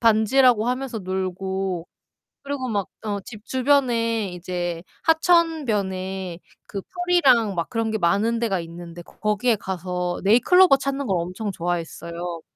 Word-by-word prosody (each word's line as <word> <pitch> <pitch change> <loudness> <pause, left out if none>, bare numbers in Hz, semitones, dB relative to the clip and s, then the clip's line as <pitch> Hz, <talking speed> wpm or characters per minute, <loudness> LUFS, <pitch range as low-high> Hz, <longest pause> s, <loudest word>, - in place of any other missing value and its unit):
반지라고 230 +1 +4
하면서 250 -2 -2
놀고 190 -1 -3 0.6
그리고 280 -2 -3
막 205 -4 -1 0.2
어 205 -1 -2
집 215 -2 -11
주변에 240 -5 +2
이제 175 -1 -4 0.2
하천변에 210 - +1 0.3
그 195 - -5
풀이랑 280 - +2
막 170 -1 -2
그런 225 -2 -1
게 220 - 0
많은 215 +5 +1
데가 205 -6 0
있는데 170 +1 -9
거기에 210 +6 0
가서 180 -2 -3
네잎클로버 275 - +6
찾는 275 0 -3
걸 190 -3 +1
엄청 185 +5 -4
좋아했어요. 170 0 -4
210 Hz, 280 characters per minute, -23 LUFS, 180-250 Hz, 0.6 s, 네잎클로버